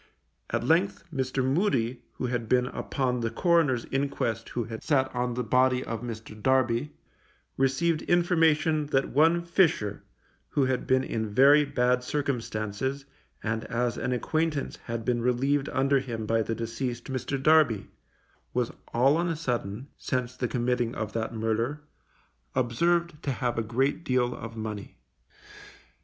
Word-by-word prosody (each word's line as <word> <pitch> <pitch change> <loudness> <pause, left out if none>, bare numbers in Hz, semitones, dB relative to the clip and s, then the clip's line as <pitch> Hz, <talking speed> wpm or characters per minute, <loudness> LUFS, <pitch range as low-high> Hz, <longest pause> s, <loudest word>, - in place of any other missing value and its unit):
At - - -1
length, 170 +10 +2
Mr. 130 -1 -1
Moody, 130 - +1
who - - -4
had 120 -3 -2
been 125 -1 +3
upon 125 -1 -2
the 115 -1 -1
coroner's 145 -2 +2
inquest 135 -5 -1
who 120 - -2
had 110 0 -7
sat 135 -3 +1
on 125 -1 -1
the 125 - -1
body 125 +2 +3
of 115 -1 -4
Mr. 115 -2 -7
Darby, 130 +2 +1 0.6
received 135 +5 +1
information 160 -3 +3
that 135 -2 +1
one 165 +4 +3
Fisher, 160 - +2 0.5
who 140 - +2
had 130 -1 -1
been 130 0 +3
in 110 -4 -2
very 140 +7 +6
bad 125 -2 +1
circumstances, 130 -1 -2 0.4
and 110 0 -1
as 120 0 -1
an 125 - -2
acquaintance 155 +4 -1
had 115 -1 -4
been 120 -1 +1
relieved 135 +4 +1
under 135 +1 +2
him 115 -4 -5
by 115 +1 +2
the 115 +1 -2
deceased 115 +2 -3
Mr. 135 +1 -3
Darby, 140 -7 +3 0.6
was 125 -2 0 0.2
all 135 +6 +4
on 175 +1 0
a 165 - -1
sudden, 125 -5 -3
since 125 -1 -2
the 125 -1 -1
committing 120 -1 0
of 110 -1 -4
that 115 0 -2
murder, 115 +6 -1 0.7
observed 170 +6 +1
to - - -3
have 120 -2 -1
a - - +2
great 130 +8 0
deal 125 -3 +1
of 115 0 -8
money. 110 -2 -6
125 Hz, 150 wpm, -27 LUFS, 115-140 Hz, 0.7 s, very